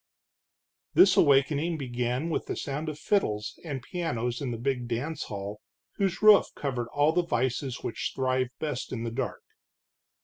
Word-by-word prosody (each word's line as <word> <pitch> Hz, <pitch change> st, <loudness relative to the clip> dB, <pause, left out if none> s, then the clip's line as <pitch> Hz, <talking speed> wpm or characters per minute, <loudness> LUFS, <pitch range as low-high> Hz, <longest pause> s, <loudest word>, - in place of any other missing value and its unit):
This 190 Hz, -1 st, +7 dB
awakening 145 Hz, +3 st, +3 dB
began 125 Hz, +3 st, -2 dB
with -, -, -2 dB
the -, -, -2 dB
sound 150 Hz, +3 st, -3 dB
of 150 Hz, -, -6 dB
fiddles 110 Hz, -, 0 dB
and 140 Hz, -7 st, -5 dB
pianos 125 Hz, -8 st, -2 dB
in 135 Hz, -, -2 dB
the 115 Hz, -, -3 dB
big 125 Hz, 0 st, -1 dB
dance 140 Hz, +6 st, -3 dB
hall 100 Hz, +1 st, -6 dB, 0.4 s
whose 195 Hz, 0 st, 0 dB
roof 215 Hz, -2 st, +8 dB
covered 125 Hz, -5 st, -2 dB
all 145 Hz, +5 st, +2 dB
the 180 Hz, -, +3 dB
vices 130 Hz, -4 st, -1 dB
which 115 Hz, -, -3 dB
thrive 130 Hz, -1 st, +1 dB
best 150 Hz, -5 st, -3 dB
in 115 Hz, -3 st, -3 dB
the 115 Hz, -, -3 dB
dark. 130 Hz, +4 st, -3 dB
135 Hz, 160 wpm, -28 LUFS, 120-155 Hz, 0.4 s, roof